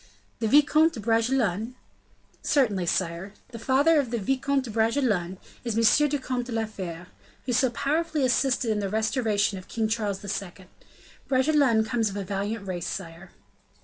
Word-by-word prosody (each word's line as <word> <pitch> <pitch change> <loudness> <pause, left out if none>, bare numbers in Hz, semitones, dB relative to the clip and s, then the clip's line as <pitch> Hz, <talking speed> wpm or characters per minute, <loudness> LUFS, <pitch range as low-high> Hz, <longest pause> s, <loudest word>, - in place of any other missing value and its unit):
"The 225 - 0
Vicomte 300 +5 +4
de 235 - -7
Bragelonne?" 225 0 0 0.7
"Certainly, 210 - +1
sire. 180 +3 -2 0.2
The 235 -2 -9
father 285 +7 +3
of 270 -4 -1
the 235 - -2
Vicomte 270 +5 0
de 240 - -7
Bragelonne 220 -5 0 0.3
is 230 -3 -2
M. 255 +6 +4
le 290 - 0
Comte 255 -2 -3
de - - -7
la 225 -1 -1
Fere, 180 -5 -7 0.4
who 250 - -1
so 255 +2 +3
powerfully 300 +4 -1
assisted 250 -2 +1
in 210 - 0
the 200 -1 -2
restoration 215 -2 0
of 185 - -14
King 225 -1 -1
Charles 210 -3 -2
II. 195 -2 -5 0.6
Bragelonne 260 -4 +3
comes 225 -2 0
of 200 - -6
a 200 - -3
valiant 200 +2 -4
race, 175 -2 -4
sire." 175 0 -7
225 Hz, 165 wpm, -26 LUFS, 200-260 Hz, 0.7 s, Vicomte